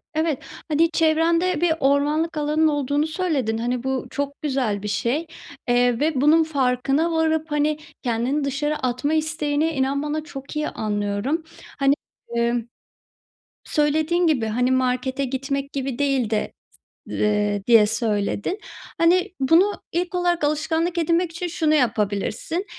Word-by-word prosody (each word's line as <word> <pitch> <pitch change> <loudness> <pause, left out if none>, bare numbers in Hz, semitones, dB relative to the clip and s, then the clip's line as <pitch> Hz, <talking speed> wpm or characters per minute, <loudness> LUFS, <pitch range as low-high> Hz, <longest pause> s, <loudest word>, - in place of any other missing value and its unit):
Evet, 315 -3 0 0.3
hani, 325 +2 +2
çevrende 330 +2 +2
bir 340 -2 +3
ormanlık 295 +4 +1
alanın 300 +2 +2
olduğunu 290 +1 0
söyledin, 305 -10 -1
hani, 245 +1 -2
bu 265 -1 -2
çok 285 0 -4
güzel 255 -9 -1
bir - - -3
şey, 270 +10 -1 0.4
eee, 245 -1 +3
ve 295 -3 +1
bunun 315 +3 +5
farkına 275 +2 +1
varıp, 320 -1 0
hani, 295 +1 +1 0.3
kendini 250 +5 0
dışarı 295 +2 -1
atma 255 +4 -1
isteğini, 310 -1 0
inan 275 0 0
bana, 305 +1 -2
çok 280 -1 -9
iyi 300 0 -1
anlıyorum. 210 +9 -2 0.4
Hani, 275 0 +4 0.4
ımm, 235 0 0 1.0
söylediğin 315 +4 +1
gibi, 260 -8 +2
hani, 250 +4 +1
markete 260 +1 0
gitmek 275 +2 -3
gibi 270 -2 -3
değil 270 -6 +1
de, 215 -1 -1 0.6
eee, 205 -1 0
diye 225 -3 +7
söyledin. 215 - -1 0.4
Hani, 355 +2 +3
bunu 335 +10 +4 0.2
ilk 355 +2 -2
olarak 350 -3 +1
alışkanlık 320 +3 0
edinmek 335 +1 +1
için 345 +2 -4
şunu 320 -2 +1
yapabilirsin, 230 - 0
290 Hz, 135 wpm, -23 LUFS, 250-320 Hz, 1.0 s, diye